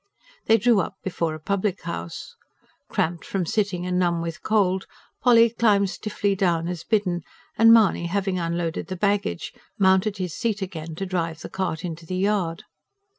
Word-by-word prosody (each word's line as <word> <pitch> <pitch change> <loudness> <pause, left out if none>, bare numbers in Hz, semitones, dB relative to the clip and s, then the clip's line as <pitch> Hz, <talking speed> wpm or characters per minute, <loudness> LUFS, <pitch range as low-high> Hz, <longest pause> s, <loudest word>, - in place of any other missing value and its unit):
They 225 - +6
drew 230 0 +4
up - - -2
before 170 -4 -2
a - - -9
public 195 +3 -1
house. 85 - -6 0.5
Cramped 170 +1 -1
from 190 -3 -2
sitting 185 -1 -1
and 180 0 0
numb 175 -2 +1
with 165 0 -5
cold, 190 -3 +1 0.3
Polly 235 -2 +6
climbed 205 -4 +3
stiffly 205 -1 -1
down 170 -3 +1
as 175 -2 -4
bidden; 185 -4 0 0.3
and 225 0 +7
Mahony 215 -6 +5
having 190 0 -1
unloaded 170 -1 -2
the 185 - -4
baggage, 200 -1 -1 0.2
mounted 190 +1 +3
to 190 - -3
his 180 -3 -4
seat 215 -3 -1
again 165 -3 -6
to 195 - -3
drive 165 -3 -2
the - - -7
cart 185 -3 -3
into 165 -1 -6
the 185 - -3
yard. 190 -4 0
185 Hz, 175 wpm, -24 LUFS, 170-205 Hz, 0.5 s, and